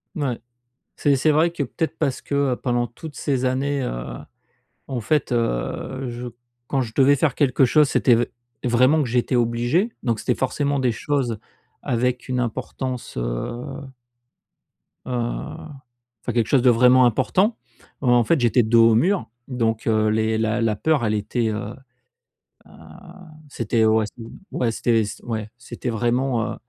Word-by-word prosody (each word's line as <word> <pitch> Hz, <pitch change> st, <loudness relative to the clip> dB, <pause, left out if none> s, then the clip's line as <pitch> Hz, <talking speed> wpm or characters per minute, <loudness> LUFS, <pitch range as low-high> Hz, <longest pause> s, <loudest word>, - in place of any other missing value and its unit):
Mouais. 140 Hz, -7 st, -2 dB, 0.6 s
C'est 140 Hz, -1 st, +2 dB
c'est 155 Hz, +4 st, +2 dB
vrai 155 Hz, +3 st, +3 dB
que 165 Hz, -4 st, -4 dB
peut-être 160 Hz, +5 st, -3 dB
parce 140 Hz, -5 st, -1 dB
que, 140 Hz, -2 st, 0 dB
pendant 120 Hz, -1 st, -1 dB
toutes 145 Hz, +5 st, -11 dB
ces 130 Hz, -1 st, -1 dB
années, 135 Hz, +2 st, 0 dB
heu, -, -, -5 dB, 0.7 s
en 130 Hz, -3 st, -3 dB
fait 140 Hz, +4 st, 0 dB
heu, 120 Hz, -, -2 dB
je 120 Hz, +1 st, -6 dB, 0.4 s
quand 135 Hz, -, 0 dB
je 115 Hz, -2 st, -6 dB
devais 140 Hz, +1 st, +5 dB
faire 140 Hz, -1 st, +1 dB
quelque 135 Hz, -2 st, +3 dB
chose, 150 Hz, +3 st, +4 dB
c'était 125 Hz, -3 st, +4 dB
v 120 Hz, +1 st, +1 dB, 0.4 s
vraiment 130 Hz, +5 st, +3 dB
que 130 Hz, -, -2 dB
j'étais 125 Hz, +2 st, 0 dB
obligé, 120 Hz, -, +1 dB
donc 115 Hz, -4 st, 0 dB
c'était 125 Hz, -, 0 dB
forcément 140 Hz, +2 st, -1 dB
des 130 Hz, -3 st, +1 dB
choses 125 Hz, -2 st, -1 dB, 0.4 s
avec 125 Hz, +1 st, -1 dB
une 125 Hz, -1 st, 0 dB
importance, 125 Hz, +1 st, -4 dB
heu -, -, -1 dB, 1.8 s
heu, -, -, -6 dB, 1.1 s
enfin, 120 Hz, -, -3 dB
quelque 115 Hz, -2 st, +1 dB
chose 135 Hz, -4 st, +3 dB
de 125 Hz, -, +5 dB
vraiment 125 Hz, +2 st, +6 dB
important. 180 Hz, -, +2 dB, 0.4 s
En 120 Hz, -3 st, +4 dB
fait, 165 Hz, +6 st, +2 dB
j'étais 120 Hz, 0 st, +3 dB
dos 115 Hz, +1 st, +5 dB
au -, -, +4 dB
mur, 180 Hz, -, +1 dB, 0.2 s
donc 115 Hz, -4 st, -1 dB
heu, 110 Hz, -1 st, +2 dB
les 110 Hz, 0 st, +1 dB
la 110 Hz, +1 st, 0 dB
la 110 Hz, -2 st, +1 dB
peur, 145 Hz, +2 st, +1 dB
elle 110 Hz, -, +1 dB
était, 110 Hz, +2 st, -1 dB
heu 105 Hz, +2 st, -4 dB, 0.9 s
heu, -, -, -19 dB, 0.8 s
c'était 115 Hz, -2 st, 0 dB
ouais, 110 Hz, 0 st, +3 dB
c'était 115 Hz, -, -11 dB, 0.3 s
ouais, 115 Hz, -2 st, 0 dB
c'était 115 Hz, 0 st, +1 dB
c'ét 105 Hz, 0 st, -7 dB
ouais, 110 Hz, -2 st, -4 dB
c'était 120 Hz, +1 st, -6 dB
vraiment, 120 Hz, +1 st, 0 dB
heu, -, -, -7 dB
125 Hz, 160 wpm, -22 LUFS, 115-135 Hz, 1.8 s, vraiment